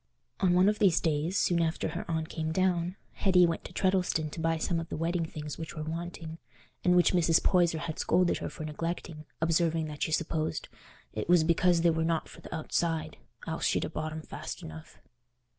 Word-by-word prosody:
On 185 -2 +3
one 180 +2 +5
of 210 0 +2
these 185 -5 +5
days, 160 +4 0
soon 175 -3 +2
after 160 -1 0
her 170 +2 -6
aunt 160 -1 -1
came 160 -1 -3
down, 180 0 +1 0.2
Hetty 185 -2 +4
went 165 -1 -1
to - - -8
Treddleston 180 -5 +1
to - - -7
buy 165 0 +1
some 165 +1 0
of 165 - -6
the - - -4
wedding 165 +1 -1
things 150 -2 -7
which 160 0 -6
were 155 - -4
wanting, 165 0 -6 0.4
and 180 0 +4
which 175 +1 +4
Mrs. 165 -2 +4
Poyser 175 -3 +3
had 160 -1 -5
scolded 180 -1 +2
her - - -4
for 160 - -8
neglecting, 160 0 -4 0.2
observing 165 0 +2
that 150 -1 -8
she - - 0
supposed 160 0 -1 0.4
"it 105 +8 -4
was 175 -2 +6
because 170 +1 +3
they 170 0 +4
were 160 0 0
not 165 0 0
for - - -13
th' - - -11
outside, 165 0 -1 0.3
else - - -2
she'd - - +1
ha' - - -5
bought 155 0 -3
'em 155 0 -6
fast - - -7
enough." 80 0 -10
165 Hz, 210 wpm, -30 LUFS, 160-175 Hz, 0.4 s, was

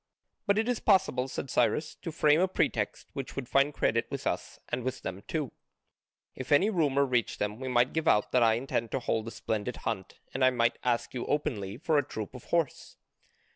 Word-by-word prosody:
"But 200 0 +3
it 220 +1 +1
is 245 -2 0
possible," 185 - +3
said 135 0 -5
Cyrus, 155 - +1
"to 170 - -4
frame 150 0 +4
a 185 - +4
pretext 185 - -1
which 135 -2 -6
would 130 -3 -4
find 140 +3 +3
credit 115 -5 +1
with - - -5
us - - -2
and 125 - -1
with 130 +1 -4
them 95 +1 -5
too, 150 -5 -2 0.8
if 130 +3 -8
any 190 +9 +5
rumour 140 -7 +2
reached 125 -3 0
them. 105 +2 -2
We 130 - -5
might 125 0 +2
give 160 0 -1
out 105 - +3
that 125 - +3
I 115 -1 +5
intend 115 -1 -2
to 135 - +1
hold 115 -2 -1
a - - -4
splendid 110 +2 -3
hunt 100 -5 -4
and 130 - 0
I 130 - +7
might 120 -2 +1
ask 120 -2 0
you 125 - -4
openly 105 -9 -1
for 150 +1 +2
a - - +1
troop 110 -4 -6
of 125 - -10
horse." 170 -5 -1
130 Hz, 215 wpm, -29 LUFS, 115-150 Hz, 0.8 s, I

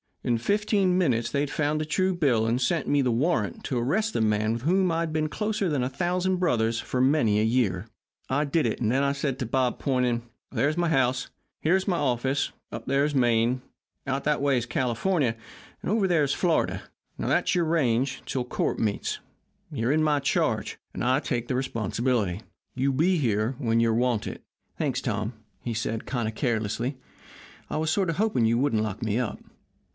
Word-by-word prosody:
In 120 - +1
fifteen 200 - +2
minutes 120 -10 +1
they 140 - +1
had 145 - -1
found 150 +1 0
a - - -2
true 185 +4 +1
bill 130 -10 +2
and 120 +3 +1
sent 150 +4 0
me 145 -1 +3
the 125 -2 +1
warrant 115 - 0
to 130 - -1
arrest 195 - 0
the - - 0
man 110 0 +2
with 115 - -3
whom 185 +3 +3
I'd 165 0 -1
been 155 -1 0
closer 210 +1 -1
than 145 -6 0
a 125 - -1
thousand 180 +5 0
brothers 115 -10 +1
for 125 - -2
many 130 -6 +3
a - - +2
year. 110 -4 +1 0.4
"I 145 +3 +1
did 150 +1 +1
it, 110 - -2
and 110 -2 +1
then 135 +2 +2
I 140 - +2
said 140 -2 -2
to 130 - -1
Bob, 125 +1 0
pointing: 125 -3 +1 0.3
'There's 150 +3 +1
my 175 -1 +1
house, 130 -4 +2
and - - -22 0.3
here's 185 +5 +2
my 180 -3 +1
office, 130 +1 0 0.2
and - - -3
up 115 - -12
there's 140 +2 +1
Maine, 120 0 +2 0.4
and 135 -1 0
out 140 - -4
that 150 -2 +1
way 140 -2 +3
is 120 0 -2
California, 125 +2 0 0.5
and - - -2
over 210 -3 +2
there 170 -4 +3
is 140 0 +1
Florida 170 -3 +1 0.3
and - - -2
that's - - +2
your 175 -2 +2
range 135 -5 +1
'til 130 - -2
court - - -1
meets. 105 -3 -1 0.5
You're 115 +3 0
in 155 +1 +3
my 150 -2 +3
charge, 140 - 0 0.2
and - - -4
I 130 +2 +3
take 120 -5 -2
the 130 - -1
responsibility. 115 -5 -1 0.3
You 135 +2 +1
be 170 +7 +2
here 115 -3 0
when 115 -4 +1
you're 115 -1 +3
wanted.' 120 -1 0 0.4
"'Thanks, - - -1
Tom,' 110 +3 -2 0.3
he 120 -2 -3
said, 110 0 -2
kind 120 -4 -1
of 110 - -4
carelessly; 120 +1 -1 0.7
'I - - -1
was 155 0 0
sort 190 +1 +1
of 165 - -2
hoping 205 - +2
you 115 +1 +3
wouldn't 120 -5 +1
lock 110 0 -4
me 110 +1 0
up. 125 -4 -3
130 Hz, 205 wpm, -26 LUFS, 115-155 Hz, 0.7 s, me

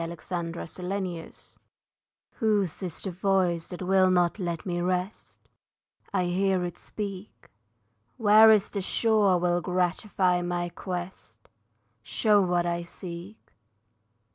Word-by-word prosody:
UNKNOWN 170 0 -5
IDEAL 180 0 -4 1.1
Whose 205 - +1
is 180 -4 -4
the 190 - -3
voice 180 -2 0
that 180 +1 -7
will 190 0 +4
not 180 +2 +2
let 170 -3 -3
me 175 -2 -2
rest? 180 +3 -3 0.7
I - - +1
hear 185 +1 +1
it 175 -1 -5
speak. 200 -1 -7 0.7
Where 220 -1 +7
is 215 -3 +4
the 200 - -2
shore 210 -1 +2
will 175 0 +1
gratify 180 0 0
my 175 0 -2
quest, 175 - -7 0.5
Show 210 - +2
what 175 -2 +1
I 170 0 -1
seek? 175 +3 -9
180 Hz, 115 wpm, -27 LUFS, 175-195 Hz, 1.1 s, Where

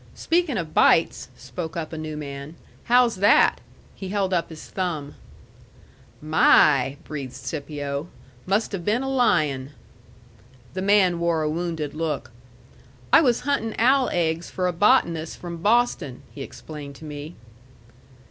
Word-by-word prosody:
"Speakin' 330 -7 0
of 165 -4 -4
bites," 165 - +3
spoke 165 -2 -6
up 165 -1 -5
a - - -3
new 155 -1 -5
man, 140 +1 -7 0.3
"how's 245 -3 +4
that?" 205 +2 +4 0.3
He 190 - -7
held 195 -1 -1
up 170 -2 0
his 160 -2 -10
thumb. 160 -6 -4 1.1
"My!" 150 -3 +4
breathed 140 -4 -6
Scipio. 145 0 -5 0.4
"Must 200 +4 +1
have 195 -4 -4
been 220 +7 0
a - - -3
lion." 150 - +1 1.0
The 185 - -3
man 190 -3 +3
wore 170 -2 +1
a 155 - 0
wounded 160 -3 -3
look. 155 -5 -3 0.8
"I - - +9
was 245 -6 +2
huntin' 250 -5 -1
owl 260 +2 +3
eggs 165 -1 -1
for 185 - -2
a 180 - 0
botanist 170 -5 +2
from 170 -1 -7
Boston," 205 - +1
he 140 - -8
explained 145 0 -9
to 155 - -12
me. 150 +2 -8
165 Hz, 140 wpm, -24 LUFS, 150-205 Hz, 1.1 s, I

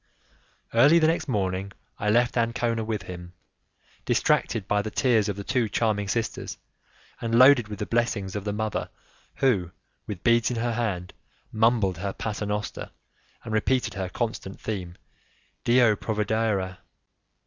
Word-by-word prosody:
Early 140 +8 +6
the 160 - +4
next 160 -1 +1
morning 100 -4 -1 0.3
I 105 - 0
left 120 +3 +3
Ancona 115 -1 0
with 110 -3 -3
him, 90 -1 -9 0.7
distracted 100 -4 +1
by 105 -1 +2
the 110 - -4
tears 110 -2 +2
of 100 - -2
the 100 - -6
two 120 -1 0
charming 105 -2 0
sisters 115 +3 -3 0.6
and 115 0 +1
loaded 130 -2 +7
with 105 -1 -6
the 105 - -3
blessings 110 -5 -1
of 100 - -3
the 105 - -2
mother 110 0 -2 0.5
who, 100 -11 +2 0.4
with 100 -4 -6
beads 115 -1 +4
in 125 - -3
hand, 115 -6 -2 0.4
mumbled 110 -5 +2
her 100 +1 -3
'paternoster', 105 -1 -4 0.5
and 110 - -5
repeated 110 0 +1
her 95 -2 -3
constant 110 -3 -4
theme: 90 -5 -5 0.7
'Dio 120 -2 +5
provedera'. 105 -3 -1
110 Hz, 140 wpm, -26 LUFS, 100-120 Hz, 0.7 s, loaded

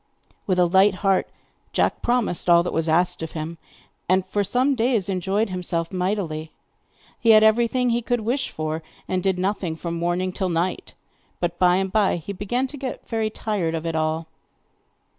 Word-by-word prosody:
With 185 -2 +1
a 180 - +5
light 190 +3 +4
heart 195 -1 +2 0.4
Jack - - +1
promised 240 -8 0
all 170 0 +6
that 175 - -3
was 160 0 0
asked 175 +2 +2
of 160 - -5
him, 160 +1 -5 0.5
and 185 0 +3
for 205 - 0
some 250 +8 +2
days 230 -5 +1
enjoyed 195 +3 0
himself 170 -2 -2
mightily. 180 -5 -2 0.7
He 230 - +1
had 215 -1 +8
everything 235 +3 +3
he 235 +1 +1
could 245 0 -1
wish 245 +4 -1
for, 155 +1 -3 0.3
and 185 0 -1
did 190 -1 +1
nothing 185 -3 -1
from 170 +1 -5
morning 175 +2 -1
till 185 0 -2
night; 175 +2 -2 0.4
but 175 0 -2
by 180 -1 +5
and 190 0 0
by 210 -2 +3
he 175 +4 -6
began 225 +7 -1
to 285 +2 -7
get 265 -2 -6
very 225 -2 -1
tired 200 -7 -2
of 160 0 -4
it 165 - -1
all. 160 +1 -1
185 Hz, 180 wpm, -23 LUFS, 170-220 Hz, 0.7 s, had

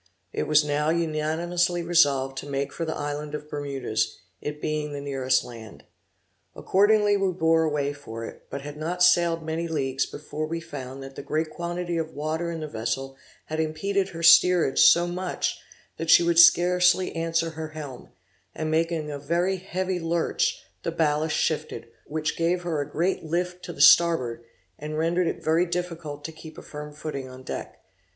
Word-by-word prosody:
It - - -2
was 150 0 +5
now 150 +1 0
unanimously 170 +2 0
resolved 140 -6 +3
to 145 - -8
make 140 0 -2
for 165 - -3
the 160 - -3
island 145 0 -4
of 150 0 -7
Bermudas, 140 -6 -2 0.2
it 150 0 -5
being 150 -1 -2
the 145 - -4
nearest 135 -2 +1
land. 115 -3 -11 0.7
Accordingly 205 +1 +3
we 195 -1 +1
bore 165 -1 +3
away 145 -2 -1
for 115 -5 -8
it, - - -11
but 140 - -5
had 145 +1 -8
not 175 +4 -1
sailed 170 -2 +4
many 160 +1 -2
leagues 135 -4 -1
before 155 +1 -5
we 165 +1 -3
found 135 -5 -8
that 135 0 -9
the - - -6
great 155 +1 -2
quantity 175 0 -3
of 160 -1 -4
water 155 +3 -2
in 165 -1 -5
the 155 - -4
vessel 135 +2 -3 0.3
had 155 0 -4
impeded 190 +5 -1
her 165 -2 -7
steerage 170 -3 +6
so 170 0 +7
much 180 +1 -2 0.4
that 165 - -4
she 170 - +8
would 170 0 +3
scarcely 180 +1 +5
answer 165 0 0
her 160 0 -6
helm; 150 -5 -9 0.5
and 155 0 -2
making 160 -1 0
a 145 - -5
very 170 +6 0
heavy 185 0 -3
lurch, 165 0 0 0.2
the - - -2
ballast 155 -1 +1
shifted, - - -2 0.2
which 155 +1 -2
gave 175 +2 0
her 165 -4 -1
a 145 - -5
great 175 +6 -1
lift 180 +3 -2
to - - -6
the - - -5
starboard, 130 -9 +5 0.4
and 155 +1 -5
rendered 170 +2 +1
it - - -3
very 165 +3 +2
difficult 170 -4 -4
to 160 - -4
keep 160 0 -12
a - - -9
firm 150 0 -8
footing 145 -3 -6
on 130 0 -11
deck. - - -6
160 Hz, 180 wpm, -25 LUFS, 145-170 Hz, 0.7 s, she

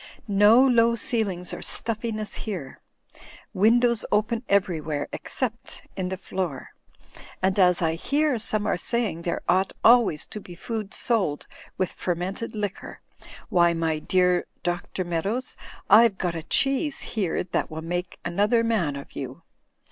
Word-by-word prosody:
No 210 +5 +6
low 235 -2 +4
ceilings 200 -6 -2
or - - -6
stuffiness 220 -1 -3
here. 175 -12 -6 0.7
Windows 235 +3 +3
open 220 +2 +1
everywhere, 160 -7 0
except 235 -3 -4
in 185 -2 -2
the 190 - -3
floor. 180 -7 -4 0.7
And 190 +1 +1
as 180 -2 +4
I 160 0 +2
hear 280 - 0
some 215 -1 -2
are 195 - 0
saying 225 -8 -1
there 170 - -3
ought 185 +2 +2
always 230 -10 +5
to 210 - -5
be 180 -3 -11
food 215 +1 -5
sold 195 -11 +1 0.3
with 185 - 0
fermented 185 +6 -3
liquor, 205 -2 -5 0.5
why, 170 -1 +4
my 160 -1 0
dear 180 +2 +2 0.2
Dr. 175 +1 -2
Meadows, 195 +9 -2 0.3
IVe 215 -1 +6
got 175 -2 -1
a 165 - -4
cheese 275 - +1
here 195 -7 0
that 180 - -2
will 160 0 -6
msJce 175 +1 -3
another 205 +6 +2
man 200 -11 0
of 140 - -9
you. 135 +4 -7
195 Hz, 140 wpm, -25 LUFS, 175-230 Hz, 0.7 s, No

